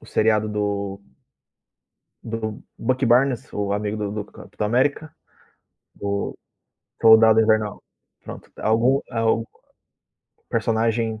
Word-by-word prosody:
o - - -16
seriado 110 -1 +1
do 100 -1 -3 1.2
do 110 -1 -5 0.2
Bucky 130 0 0
Barnes, 125 +1 +2
o 100 -1 -2
amigo 105 +1 -2
do 105 -1 -3
do 105 -1 -4
Capitão 105 - -6
América, 140 +6 0 0.8
do 100 0 -3 0.6
Soldado 110 0 +7
Invernal. 110 -1 +1 0.4
Pronto, - - -10
algum, 120 +5 +2
al 115 -1 +1 1.1
personagem 115 0 0
110 Hz, 100 wpm, -22 LUFS, 105-115 Hz, 1.2 s, Soldado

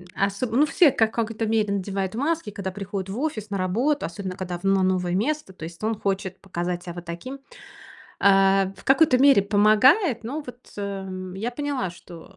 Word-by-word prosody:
м, 180 - -14
осо 200 +5 0
ну, 250 +7 +3
все 320 -1 +5
в - - -16
какой-то 225 0 0
мере 215 -2 +1
надевают 195 0 -3
маски, 305 -1 -1
когда 195 -2 -5
приходят 195 -1 -5
в 215 - -5
офис 225 -9 -3
на 200 - -2
работу, 235 +11 0
особенно 185 +2 -6
когда 180 -2 -5
в 175 - -19
но 195 -1 +3
новое 180 -1 0
место, 275 +1 -1
то 160 - -10
есть 170 +4 -10
он 220 -1 -1
хочет 195 -1 -2
показать 175 -2 -4
себя 175 - -7
вот 175 0 -8
таким. 255 +12 -7 0.8
А, 195 -1 +4
в - - -16
какой-то 270 -1 +4
мере 270 -7 +6
помогает, 220 - +4
но 275 +7 -4
вот, 245 0 -9 0.2
э, 190 -2 -5
я 220 +5 -3
поняла, 270 -6 -3
что 175 +2 -14
200 Hz, 195 wpm, -24 LUFS, 185-240 Hz, 0.8 s, мере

